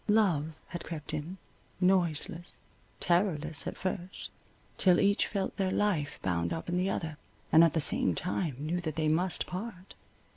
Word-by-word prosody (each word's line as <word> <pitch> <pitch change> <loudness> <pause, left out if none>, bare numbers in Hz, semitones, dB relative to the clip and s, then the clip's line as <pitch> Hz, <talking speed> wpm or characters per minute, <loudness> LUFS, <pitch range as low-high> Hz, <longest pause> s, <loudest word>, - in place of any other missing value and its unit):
Love 180 -8 +3 0.2
had 175 -1 -5
crept 155 -2 -6
in, 155 +5 -4 0.4
noiseless, 175 -2 +1 0.4
terrorless 165 -4 +1
at - - -4
first, 185 0 -4 0.5
till 180 -2 +5
each 200 +1 +3
felt 195 -3 -2
their 190 -1 +1
life 185 -8 0
bound 85 -2 0
up 165 - -4
in 175 - -1
the 180 +2 +1
other, 160 -5 -3 0.3
and 160 - +8
at 165 - +4
the 160 - +2
same 150 - +4
time 175 -5 -1
knew 160 +5 -2
that 155 -4 -3
they 155 -1 +1
must 175 +4 +1
part. 185 0 -7
175 Hz, 160 wpm, -31 LUFS, 155-185 Hz, 0.5 s, and